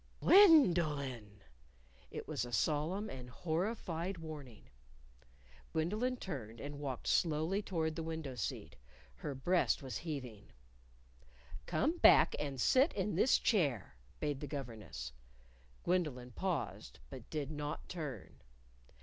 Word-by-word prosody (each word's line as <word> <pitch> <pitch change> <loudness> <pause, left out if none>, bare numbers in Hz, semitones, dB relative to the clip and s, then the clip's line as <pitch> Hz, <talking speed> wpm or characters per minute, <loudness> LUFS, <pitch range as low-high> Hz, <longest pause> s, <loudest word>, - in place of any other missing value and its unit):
"Gwen 325 - +8
do 175 - +3
lyn'!" 125 -9 -5 0.7
It - - -7
was - - -2
a 120 - -6
solemn 155 - 0
and 125 -9 -8
horrified 175 - -2
warning. 145 - -9 1.1
Gwendolyn 215 +11 0
turned 120 - -6
and 145 +3 -6
walked 135 -4 -4
slowly 165 +4 +1
toward 160 -6 -2
the 165 - -3
window 160 -4 -4
seat. 120 - -4 0.4
Her 135 - -5
breast 175 +3 +1
was 130 - -4
heaving. 130 -11 -6 1.1
"Come 295 - 0
back - - +7
and 140 -3 -3
sit 265 - +4
in 205 0 -1
this 230 +8 +5
chair," 145 - +1 0.2
bade 145 -3 -1
the 145 - -5
governess. 110 - -6 0.7
Gwendolyn 150 -9 0
paused, 165 - -3
but - - -9
did 150 -2 -3
not 150 -1 -5
turn. 150 - -7
150 Hz, 125 wpm, -35 LUFS, 130-180 Hz, 1.1 s, Gwen